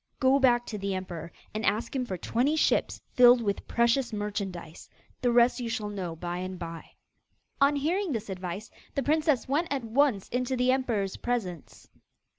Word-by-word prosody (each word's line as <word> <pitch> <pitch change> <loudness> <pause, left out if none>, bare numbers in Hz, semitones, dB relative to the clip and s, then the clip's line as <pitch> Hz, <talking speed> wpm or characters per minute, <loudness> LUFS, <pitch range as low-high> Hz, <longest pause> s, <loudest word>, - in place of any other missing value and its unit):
Go 265 0 +4
back 240 -2 +4
to 210 - -5
the 195 0 -2
emperor 175 -3 -6 0.2
and 215 +1 -3
ask 215 +6 0
him 255 -2 0
for 185 - -3
twenty 250 - 0
ships 315 - +1
filled 245 0 +7
with 205 -4 -2
precious 235 +2 +2
merchandise. 200 -6 -5 0.3
The 245 -2 +2
rest 240 +2 +4
you 240 -2 -3
shall 215 -2 -3
know 185 -5 -4
by 175 +2 -4
and 185 0 -5
by.' 165 -1 -8 0.7
On 280 +1 +5
hearing 340 +6 0
this 225 -4 -3
advice, 185 +1 -6 0.2
the 275 - 0
princess 305 -2 +2
went 300 +6 +1
at 275 -3 -2
once 230 -3 +2
into 250 +1 -1
the 250 +1 +3
emperor's 230 -7 -1
presence. 200 - -4
235 Hz, 175 wpm, -28 LUFS, 195-260 Hz, 0.7 s, filled